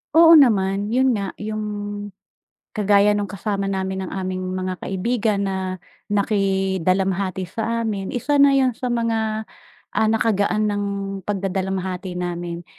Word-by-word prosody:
Oo 330 -1 +9
naman 200 -5 +3
yun 255 +3 +3
nga, 200 -4 -2
yung, 215 0 -4 1.1
kagaya 205 -1 +3
nung 205 - -1
kasama 200 0 -3
namin 190 -1 -2
ng - - -9
aming 185 -1 -3
mga 185 0 -2
kaibigan 210 +2 -1
na 195 -1 -1 0.5
naki-dalamhati 190 -2 0
sa 230 +2 -2
amin, 205 -4 -3
isa 285 +4 +1
na 280 0 +6
yun 265 -2 +4
sa 250 +1 -6
mga, 225 -2 0 0.5
ah, 220 - +2
nakagaan 215 -1 +1
ng 205 -1 -1 0.5
pag-dadalamhati 190 -2 -2
namin, 175 -1 -4
200 Hz, 125 wpm, -22 LUFS, 190-220 Hz, 1.1 s, Oo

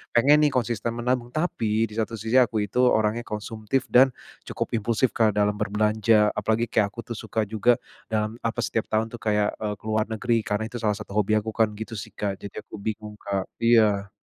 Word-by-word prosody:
pengen 140 +5 +6
nih 145 - +2
konsisten 120 -2 -1
menabung 120 0 -1
tapi 115 -9 0
di - - -12
satu 115 +1 -1
sisi 110 +4 +1
aku 115 -3 +2
itu 105 - -7
orangnya 110 +1 +1
konsumtif 110 +4 -3
dan, 130 +2 +7 0.4
cukup - - -3
impulsif 115 +3 +1
Kak 110 -2 +3
dalam 105 0 +2
berbelanja 105 0 +2
apalagi 110 +1 +1
kayak 105 -3 +2
aku 115 - -11
tuh - - -8
suka 110 +1 -2
juga 110 +3 +2 0.4
dalam 110 +1 -1
apa 115 +1 -1
setiap 115 - -1
tahun 110 +1 +1
tuh - - -5
kayak, 105 -1 +1
eee, 105 -1 -3
ke - - -31
luar 110 0 +1
negeri 115 +1 0
karena 105 +1 -1
itu 125 - -6
salah 105 -2 +2
satu 105 -1 -9
hobi 105 +1 +3
aku 110 - -5
kan 110 -2 +3
gitu 110 +1 -6
sih 95 - -8
Kak 100 -2 -3
jadi 100 - -7
aku - - -9
bingung 105 0 -5
Kak 100 -2 -3
iya. 105 -4 +4
110 Hz, 205 wpm, -25 LUFS, 105-115 Hz, 0.4 s, dan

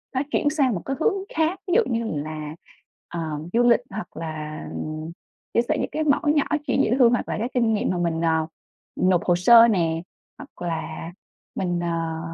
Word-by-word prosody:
nó 260 - +2
chuyển 290 - +2
sang 275 -6 +1
một 175 - -4
cái 270 - -2
hướng 425 +5 +3 0.2
khác, 320 +3 +1
ví 355 - 0
dụ 475 - +6
như 230 0 0 0.2
là, 155 0 -6 0.6
ờ, 170 - -3 0.3
du 240 +1 +4
lịch 240 0 +5
hoặc 215 +3 -7
là 155 -1 -5 0.9
chia 235 - +4
sẻ - - +2
những - - -2
cái 310 - -1
mẩu 285 +1 +2
nhỏ 290 - +4 0.2
chuyện - - +2
dễ - - 0
thương, 240 -2 +6
hoặc 240 - -1
là - - -2
cái 235 +3 -2
kinh 230 -3 +2
nghiệm 210 - 0
mà 180 - -1
mình, 170 -1 -1
ờ, 160 -1 +1 0.5
nộp 185 -1 +2
hồ 175 - +3
sơ 230 +6 +7
nè, 165 -6 +1 0.4
hoặc - - -11
là 165 +1 -5 0.4
mình, 175 -2 -1
à, 165 -1 -2
190 Hz, 200 wpm, -24 LUFS, 165-245 Hz, 0.9 s, sơ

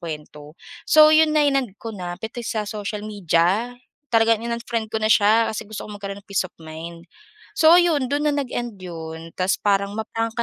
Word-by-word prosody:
kuwento? 150 -2 -9 0.3
So 310 0 +7
'yon 310 0 +4
na, 300 - +4
inend 270 -8 0
kona, 185 -6 -6
pati 225 +4 -7
sa 220 -2 -3
social 210 0 -5
media, 205 +4 0 0.3
talagang 225 -1 +3
in-unfriend 235 -1 -3
ko 220 - -3
na 215 - +2
siya 220 +2 +4
kasi 215 -1 -6
gusto 215 - -6
kong 205 -1 -9
magkaroon 200 0 -5
ng - - -56
peace 195 - +1
of - - -50
mind. 165 +1 -9 0.5
So 320 0 +5
ayun, 330 -7 +3
dun 290 +1 0
na 295 - +2
nag-end 240 -6 -4
yun, 165 -2 -8
tas 185 +1 +1
parang 200 0 0
ma-prangka 225 +1 -3
215 Hz, 185 wpm, -22 LUFS, 185-235 Hz, 0.5 s, So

